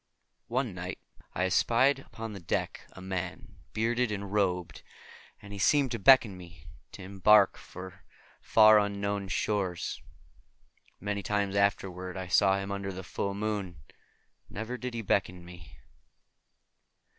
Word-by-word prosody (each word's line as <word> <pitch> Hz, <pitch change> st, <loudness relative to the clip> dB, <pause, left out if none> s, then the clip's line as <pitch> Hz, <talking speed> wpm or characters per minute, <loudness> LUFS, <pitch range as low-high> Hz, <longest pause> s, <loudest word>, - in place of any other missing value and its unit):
One 125 Hz, -3 st, -1 dB
night 90 Hz, +1 st, -6 dB, 0.4 s
I 90 Hz, -, +1 dB
espied 120 Hz, +8 st, +3 dB
upon 115 Hz, -4 st, -8 dB
the 100 Hz, -, -7 dB
deck 85 Hz, -, -3 dB
a 95 Hz, -, -11 dB
man, 95 Hz, -1 st, -5 dB
bearded 120 Hz, +1 st, 0 dB
and 100 Hz, -1 st, -5 dB
robed, 90 Hz, -4 st, -1 dB, 0.6 s
and 100 Hz, 0 st, -11 dB
he 100 Hz, -, -7 dB
seemed 140 Hz, +5 st, +3 dB
to 115 Hz, -, -3 dB
beckon 120 Hz, -3 st, +6 dB
me 85 Hz, -3 st, -13 dB, 0.3 s
to -, -, -9 dB
embark 100 Hz, +1 st, +4 dB
for 95 Hz, 0 st, -11 dB, 0.4 s
fair 110 Hz, -1 st, +6 dB
unknown 100 Hz, -1 st, -2 dB
shores. 95 Hz, -2 st, -2 dB, 1.0 s
Many 100 Hz, +1 st, -3 dB
times 100 Hz, 0 st, -1 dB
afterward 95 Hz, -2 st, -1 dB
I 95 Hz, -1 st, -6 dB
saw 95 Hz, 0 st, +4 dB
him 100 Hz, 0 st, -4 dB
under 100 Hz, 0 st, -3 dB
the 95 Hz, 0 st, -7 dB
full 100 Hz, +2 st, -3 dB
moon, 100 Hz, -4 st, -3 dB, 0.7 s
and -, -, -12 dB
ever 110 Hz, +4 st, -4 dB
did 125 Hz, -1 st, -5 dB
he 115 Hz, -, -3 dB
beckon 90 Hz, -3 st, -1 dB
me. 90 Hz, -1 st, -13 dB
100 Hz, 140 wpm, -29 LUFS, 95-110 Hz, 1.0 s, beckon